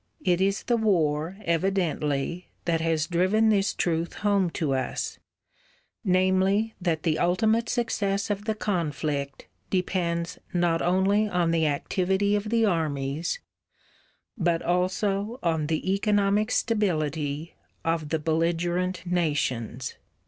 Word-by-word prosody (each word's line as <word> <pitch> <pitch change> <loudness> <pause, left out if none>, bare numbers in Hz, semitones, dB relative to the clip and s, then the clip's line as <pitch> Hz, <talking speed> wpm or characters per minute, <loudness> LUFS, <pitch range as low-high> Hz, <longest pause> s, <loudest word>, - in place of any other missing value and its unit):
It 180 0 +3
is 195 +1 +1
the 240 - +1
war, 170 -5 +1
evidently, 170 -2 0 0.2
that 165 -2 +1
has 160 -2 +1
driven 185 +6 +2
this 200 -2 +3
truth 165 -1 -1
home 200 -3 +3
to 150 -5 0
us: 130 -1 -2 0.8
namely 190 +3 +2
that 165 -3 0
the 160 -2 +1
ultimate 220 +6 +2
success 205 -4 0
of 205 0 -3
the 220 -1 0
conflict 150 -8 -2 0.2
depends 175 -2 -1
not 175 -2 +2
only 195 +4 +2
on 175 -3 +1
the 160 -2 +2
activity 190 +7 +1
of 205 +1 -2
the 230 0 +3
armies, 155 - -1 0.9
but 175 -6 0
also 195 +5 0
on 160 -3 +1
the 165 +4 0
economic 205 +1 +2
stability 160 - -1 0.3
of 165 -2 0
the 160 - +1
belligerent 170 +3 0
nations. 140 -8 -1
175 Hz, 120 wpm, -26 LUFS, 160-200 Hz, 0.9 s, It